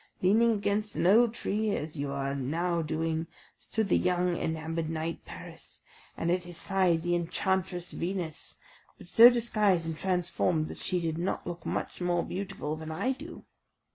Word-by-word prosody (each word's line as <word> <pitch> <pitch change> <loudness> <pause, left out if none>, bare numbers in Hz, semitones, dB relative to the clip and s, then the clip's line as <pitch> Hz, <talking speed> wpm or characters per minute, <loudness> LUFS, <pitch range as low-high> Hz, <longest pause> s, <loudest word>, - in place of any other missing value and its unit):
Leaning 225 +5 +5
against 205 0 -1
an - - 0
old 225 +5 +6
tree, 215 -1 -1
as 150 +1 -4
you 140 -1 -2
now 140 +5 -1
are - - +1
doing, 160 +1 -2 0.3
stood 220 -2 -1
the - - +3
young 180 -1 +1
enamoured 160 0 -2
knight 165 +1 -3
Paris, - - -10 0.3
and 170 - 0
at 180 +1 +2
his 175 -1 -8
side 185 -4 +2
the 175 0 0
enchantress 180 +1 -1
Venus, 175 -3 -4 0.4
but - - -13
so 230 +7 +9
disguised 215 -7 +2
and 165 -1 -3
transformed, 175 -2 0
that - - -7
she 180 - -1
did 165 -1 -2
not 180 +3 -2
look 175 -1 -6
much - - -3
more 175 -1 +1
beautiful 190 -5 -4
than 160 0 -7
I 160 +12 0
do. 310 +6 -8
175 Hz, 170 wpm, -29 LUFS, 160-195 Hz, 0.4 s, so